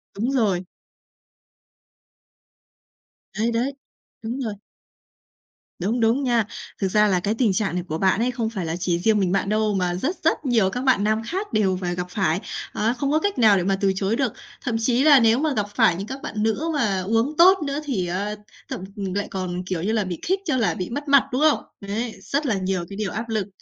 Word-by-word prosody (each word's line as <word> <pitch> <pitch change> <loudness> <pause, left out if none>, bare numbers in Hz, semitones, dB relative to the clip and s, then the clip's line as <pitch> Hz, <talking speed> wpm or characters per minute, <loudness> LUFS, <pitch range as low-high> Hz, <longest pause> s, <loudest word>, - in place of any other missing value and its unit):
Đúng 235 +6 -1
rồi. 205 -9 +1 2.8
Đấy, 230 +2 +1
đấy. 245 +5 0 0.5
Đúng 235 +4 -4
rồi. 220 -5 -2 1.3
Đúng, 220 +7 0
đúng 230 +5 +2
nha. 235 -4 +2 0.4
Thực 195 - +2
ra 210 +2 +3
là 185 -3 +2
cái 205 +4 -1
tình 225 -4 +2
trạng 195 -4 0
này 180 - -1
của 155 - -2
bạn 190 +3 +2
ấy 250 +2 +1
không 230 -3 -2
phải 190 -7 -4
là 160 - -2
chỉ 175 -1 -1
riêng 215 +2 +3
mình 185 -2 +1
bạn 195 +1 0
đâu 215 -1 +1
mà 180 -2 0
rất 290 - -1
rất 320 -2 +1
nhiều 225 -7 +3
các 250 +6 -4
bạn 260 -6 +3
nam 215 +1 +1
khác 380 - -4
đều 190 -4 +2
phà 175 -1 -1
gặp 180 0 -4
phải, 180 -2 0 0.3
á, 225 +3 +1
không 275 +3 -2
có 310 - +3
cách 405 -8 -1
nào 210 -4 +6
để 180 - 0
mà 195 +1 +1
từ 195 -1 +3
chối 195 +3 0
được. 260 -4 0 0.3
Thậm 240 -4 -2
chí 245 +3 +2
là 290 -3 +8
nếu 230 +2 +4
mà 310 -1 +1
gặp 210 -5 0
phải 170 - +4
những 195 +4 -5
các 265 +2 -6
bạn 215 0 -3
nữ 225 +7 0
mà 205 -10 +1
uống 225 +9 0
tốt 375 +3 +7
nữa 280 +1 -2
thì, 195 -11 -1
ơ, 200 +4 -2 0.3
thậm - - -4
lại 200 0 -3
còn, 185 -1 -3
kiểu 180 -2 -3
như 215 - 0
là, 220 -2 +1
bị 180 -3 -5
khích 380 +2 +1
cho 265 -6 +1
là 190 -8 +2
bị 180 +1 -4
mất 290 +4 -5
mặt, 280 -1 +6
đúng 255 +4 -1
không? 310 -1 +3 0.2
Đấy, 220 +4 -3
rất 290 +2 -2
là 225 -6 +1
nhiều 185 -2 -1
cái 195 - -8
điều 210 -3 -2
áp 225 +2 -4
lực. 215 -3 -1
215 Hz, 225 wpm, -23 LUFS, 190-255 Hz, 2.8 s, là